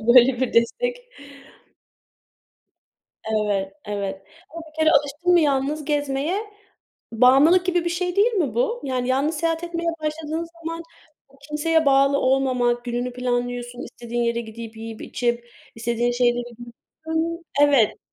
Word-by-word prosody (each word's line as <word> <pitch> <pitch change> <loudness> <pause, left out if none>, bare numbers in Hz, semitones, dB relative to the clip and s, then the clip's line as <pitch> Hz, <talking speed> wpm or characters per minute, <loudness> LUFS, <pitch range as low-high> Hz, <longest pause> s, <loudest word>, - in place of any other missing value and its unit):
böyle 240 +2 +5
bir 260 - 0
destek. 485 - +1 2.3
Evet, 205 -3 0
evet, 200 -2 -4 0.3
ama 335 +1 -8
bir - - -19
kere 315 0 +4
alıştın 295 +4 +2
mı 350 - +6
yalnız 290 0 0
gezmeye, 290 +4 -1 0.7
bağımlılık 270 +10 +5
gibi 355 -2 +1
bir - - +1
şey, 355 +1 -2
değil 435 +4 +3
mi 360 -9 0
bu? 485 0 0
Yani 255 -2 -2
yalnız 280 +5 +1
seyahat 330 +1 -1
etmeye 340 0 -2
başladığın 310 +1 -3 0.2
zaman 330 +1 -4 0.6
kimseye 300 +2 0
bağlı 275 0 +4
olmamak, 255 -3 +1
gününü 245 +1 -3
planlıyorsun, 245 0 -3
istediğin 240 0 -4
yere 235 0 0
gidip 225 0 -9
yiyip 225 0 -8
içip 240 -1 -2 0.3
istediğin 235 +1 0
şeyleri 245 0 +1 0.6
Hı, 320 - -4 0.5
evet. 280 -7 +4
270 Hz, 130 wpm, -23 LUFS, 240-320 Hz, 2.3 s, mı